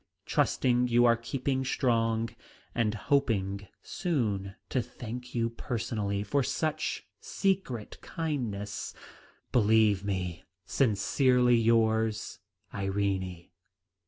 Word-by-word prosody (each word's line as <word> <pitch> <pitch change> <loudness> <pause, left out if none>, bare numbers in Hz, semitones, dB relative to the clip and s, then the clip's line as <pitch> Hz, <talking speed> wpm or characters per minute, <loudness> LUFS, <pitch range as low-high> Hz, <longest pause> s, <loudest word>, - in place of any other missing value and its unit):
Trusting 125 -1 +2
you 120 0 +4
are 120 -1 +6
keeping 130 +3 -2
strong, 115 -3 +1 0.4
and 110 -2 +1
hoping 100 -7 0 0.2
soon 105 - -1
to 130 - +1
thank 125 +3 -8
you 115 -1 +1
personally 105 -4 -2
for 140 +7 +1
such 155 +4 -1
secret 185 - -2
kindness, 120 - -3 0.6
"Believe 110 -3 +4
me, 90 -4 -3 0.2
"Sincerely 125 +2 +3
yours, 110 -1 +2 0.3
"IRENE. 95 -3 -2
115 Hz, 90 wpm, -29 LUFS, 100-125 Hz, 0.6 s, are